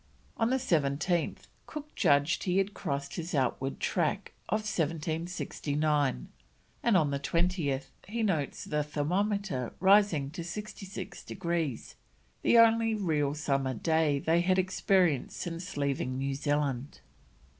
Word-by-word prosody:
On 225 0 +1
the 260 - +2
17th 165 - 0 0.2
Cook 300 -1 -8
judged 145 +4 +2
he 180 0 +1
had 195 +1 +1
crossed 140 -5 -4
his 170 -1 -3
outward 135 0 0
track - - -1 0.2
of 215 - +1
1769, 155 - -1 0.5
and 230 -5 +4
on 150 -5 +2
the 140 - -1
20th 165 -3 0 0.2
he 225 +3 -2
notes 160 -9 -1
the 150 0 0
thermometer 170 - -1
rising 190 -7 +4
to 170 +1 -6
66 195 +1 -7
degrees, 170 - -3 0.4
the 235 - +4
only 225 -1 +5
real 150 -8 0
summer 135 -3 0
day 160 +3 +2
they 165 +4 +2
had 185 +1 +2
experienced 185 -5 +2
since 175 0 -5
leaving 135 -2 -1
New 135 +1 -1
Zealand. 145 -2 -1
160 Hz, 125 wpm, -30 LUFS, 140-190 Hz, 0.5 s, only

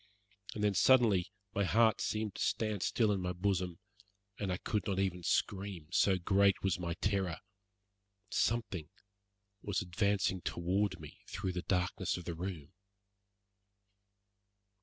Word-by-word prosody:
And 105 - -2
then, 105 -1 +3
suddenly, 105 -4 +4 0.2
my 100 - +1
heart 110 +2 +3
seemed 110 -2 -1
to - - -7
stand 110 -3 0
still 110 +1 +2
in 100 -2 0
my 90 0 -2
bosom, 90 -2 -1 0.6
and 100 -3 -1
I 90 - -1
could 105 -1 -2
not 100 -2 0
even 95 -2 0
scream, 95 -2 -1
so 95 +1 +4
great 100 +2 +3
was 95 -3 +1
my 85 -1 -3
terror. 95 -3 0 0.9
Something 100 -9 0 0.7
was 100 -3 -1
advancing 95 +1 0
toward 95 +4 -1
me 75 -1 -11
through 95 +1 -3
the 90 0 -3
darkness 90 0 0
of 90 - -8
the 85 - -3
room. 85 -2 -6
95 Hz, 140 wpm, -34 LUFS, 90-100 Hz, 0.9 s, suddenly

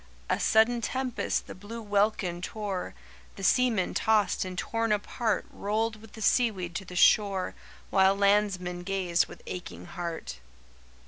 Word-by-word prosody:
"'A - - +1
sudden 230 +2 +4
tempest 255 +1 -1
the - - -8
blue 205 +5 -8
welkin 205 -4 0
tore, 200 -1 -4 0.4
The 195 - -9
seamen 230 -3 +2
tossed 215 -2 +2
and 185 -1 -6
torn 230 +3 -1
apart 210 +1 0
Rolled 220 +2 -1
with 225 -1 -15
the 220 - -6
seaweed 200 -8 +2
to 195 - -7
the 180 - -9
shore 195 0 +4 0.4
While 190 0 +5
landsmen 200 -3 +1
gazed 180 -2 +1
with - - -13
aching 180 - -7
heart. 170 - -6
200 Hz, 140 wpm, -28 LUFS, 185-220 Hz, 0.4 s, While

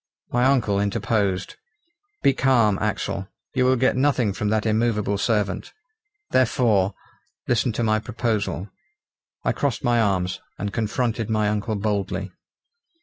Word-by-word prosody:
My 120 +1 +2
uncle 120 -7 +2
interposed. 100 -2 -1 0.7
"Be 135 - +5
calm, 120 -7 +3
Axel! 100 -2 -2 0.3
you 130 -1 +2
will 130 +1 +4
get 130 +1 +2
nothing 130 -6 +2
from 105 +1 -2
that 110 0 +1
immovable 110 -2 +1
servant. 105 -2 -1 0.6
Therefore, 115 -6 +2 0.5
listen 120 +1 +2
to 120 - -1
my 110 -1 +2
proposal." 110 -5 -2 0.7
I - - +2
crossed 140 -5 -1
my 120 -1 +3
arms, 95 -4 0 0.2
and 100 0 -4
confronted 115 +1 -1
my 110 -1 +1
uncle 105 +1 -1
boldly. 100 -2 -2
110 Hz, 130 wpm, -23 LUFS, 100-120 Hz, 0.7 s, Be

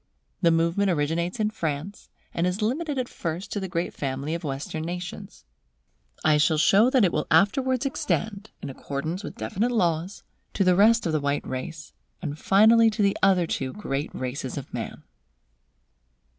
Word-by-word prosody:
The 170 - +5
movement 170 +4 +2
originates 170 +5 -1
in 215 0 +1
France, 160 +1 -4 0.2
and 170 +2 0
is 185 +4 -2
limited 285 +6 -1
at 255 -1 -1
first 170 -1 -5
to 205 - -2
the 190 - -4
great 175 -1 -2
family 140 +2 -3
of 170 - -4
Western 145 +2 -4
nations. 180 - -7 0.8
I 155 -1 +4
shall 155 +1 +3
show 200 +9 +5
that 255 -5 +4
it 175 - 0
will 150 - -1
afterwards 255 - +3
extend, 220 -7 -2
in 140 - -4
accordance 155 +8 -4
with - - -7
definite 185 - -1
laws, 180 -4 -1 0.3
to 195 - +2
the 180 -1 +4
rest 225 +4 +5
of 165 - 0
the 155 - +2
white 140 0 -1
race, 150 +4 -6 0.3
and 150 -3 -5
finally 225 +3 +5
to 215 -1 -1
the 200 0 +2
other 185 -3 +4
two 130 -5 -3
great 145 -8 -3
races 130 +1 -4
of 140 - -7
man. - - -6
175 Hz, 170 wpm, -25 LUFS, 150-210 Hz, 0.8 s, The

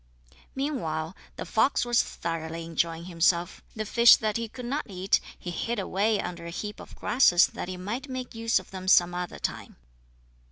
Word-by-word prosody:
Meanwhile, 185 - -2 0.2
the - - -6
fox 245 +3 +2
was 240 0 +4
thoroughly 165 0 -5
enjoying 165 0 -1
himself. 170 0 +1
The 215 -1 -3
fish 235 +2 +7
that 215 -1 -2
he 230 -1 -2
could 250 +2 -8
not 275 +2 -3
eat 190 0 +1 0.2
he 175 - -6
hid 230 +7 -2
away 200 +2 +1
under 170 -1 -5
a - - -5
heap 210 +4 -6
of - - -12
grasses 185 -8 +5
that - - -6
he 185 0 -5
might 230 +10 -5
make 255 -1 -5
use 225 0 +1
of - - -5
them 185 -1 -7
some 175 -1 +5
other 180 0 -4
time. - - -5
190 Hz, 185 wpm, -27 LUFS, 170-230 Hz, 0.2 s, fish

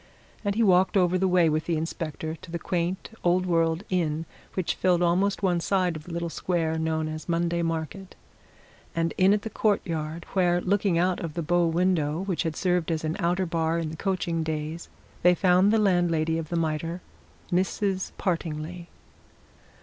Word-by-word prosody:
And 200 -1 0
he 230 - +3
walked 190 0 +4
over 180 -1 +3
the 190 +1 +2
way 180 -2 +4
with 155 0 0
the 170 -2 +1
inspector, 160 0 -4
to 170 - -14
the 170 - -3
quaint 175 +3 -2
old 180 +1 +3
world 165 0 +1
inn 165 -3 0 0.3
which 185 -3 0
filled 180 -1 +2
almost 190 +4 +1
one 180 -2 +2
side 180 -1 +1
of 155 0 -8
the 175 - -9
little 170 0 -2
square 160 -3 -1
known 160 0 -1
as 155 +2 -6
Monday 170 0 +1
Market, 165 +3 -4 0.8
and 165 0 0
in 185 +1 +4
at 205 0 +2
the 220 - -4
courtyard, 165 -6 -1
where, 175 -2 +3
looking 195 -1 +1
out 180 +1 +1
of 165 -3 -5
the 170 - -2
bow 175 +2 +2
window 165 -2 +1
which 190 -4 -1
had 165 -3 -2
served 180 -2 0
as 160 -1 -1
an 155 +1 -1
outer 180 +1 +1
bar 165 -1 0
in 165 -2 -2
the - - -6
coaching 175 -2 -1
days, 160 +1 -4 0.3
they 180 +1 +5
found 185 +2 +4
the 225 - +4
landlady 170 -5 +2
of 160 -2 -6
the 175 - -2
Mitre, 165 +2 -1 0.5
Mrs. 190 +1 0
Partingley. 170 -1 -3
170 Hz, 180 wpm, -26 LUFS, 160-185 Hz, 0.8 s, they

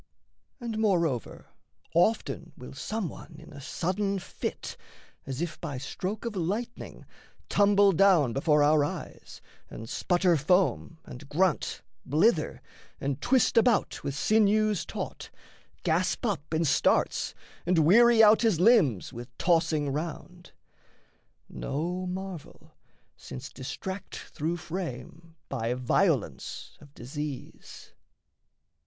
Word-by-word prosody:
And, 230 -3 -4
moreover, 170 - 0 0.4
Often 170 -2 +1
will 125 - -10
some 215 +8 -3
one - - -11
in - - -13
a 140 - -10
sudden 195 +7 -1
fit, 180 - -5 0.5
As 135 +4 -3
if 170 -2 -6
by 140 - -4
stroke 185 - -5
of 230 -2 -4
lightning, 205 +7 -4 0.4
tumble 205 -1 +5
down 175 -9 +4
Before 150 +2 +3
our 150 0 +4
eyes, 145 - -7 0.3
and 110 - -8
sputter 175 +4 +2
foam, 170 +2 +1
and 135 +3 -11
grunt, 180 +1 0 0.2
Blither, 160 - +1 0.4
and 140 0 -3
twist 260 -3 +2
about 230 -1 +2
with 140 - -3
sinews 215 +2 +2
taut, - - -6 0.5
Gasp 180 +7 0
up 165 -10 -2
in 165 +1 +1
starts, 135 - +1 0.3
and 180 -1 +3
weary 230 +5 +7
out 215 +1 +6
his 220 -8 +2
limbs 175 - +4
With 120 +1 -10
tossing 160 -4 +2
round. 170 +4 -6 1.0
No 175 +6 -3
marvel, 185 -3 -7 0.4
since 130 +1 -9
distract 180 +8 -6
Through 165 +4 -4
frame 165 -1 -7
by 115 +2 -2
violence 125 - -1
of 145 - -15
disease. 145 +2 -8
170 Hz, 115 wpm, -28 LUFS, 145-200 Hz, 1.0 s, weary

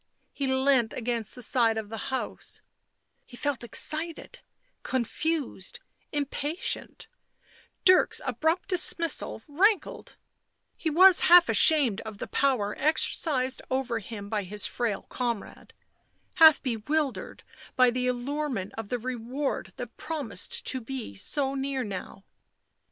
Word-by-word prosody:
He 275 - -2
leant 265 -3 +2
against 235 -3 -3
the 250 - -10
side 230 -4 +2
of 215 -2 -4
the 225 -1 -5
house; 265 0 -5 0.6
he 245 - -13
felt 285 -3 -2
excited, 315 - -4 0.4
confused, 260 - -2 0.3
impatient; 290 +3 -2 0.8
Dirk's 370 0 +5
abrupt 320 - 0
dismissal 335 - 0
rankled, 380 +7 +1 0.6
he 320 - -2
was 365 +4 +7
half 350 0 +8
ashamed 275 - +4
of 220 -2 -8
the - - -5
power 240 -7 0
exercised 270 -2 0
over 260 -3 -1
him 205 -1 -8
by 210 0 -1
his 205 +2 -3
frail 230 -4 -2
comrade, 235 -4 -4 0.7
half 320 -3 +8
bewildered 270 +4 -2 0.3
by 255 -1 +5
the 250 +1 -1
allure 280 +5 -2
ment 200 -6 -4
of 220 -2 -6
the 245 - -1
reward 255 +3 -3
that 245 -2 -8
promised 280 - -3
to 260 - 0
be 245 - -6
so 270 - 0
near 270 -1 -2
now. 195 -1 -7
260 Hz, 125 wpm, -27 LUFS, 225-300 Hz, 0.8 s, half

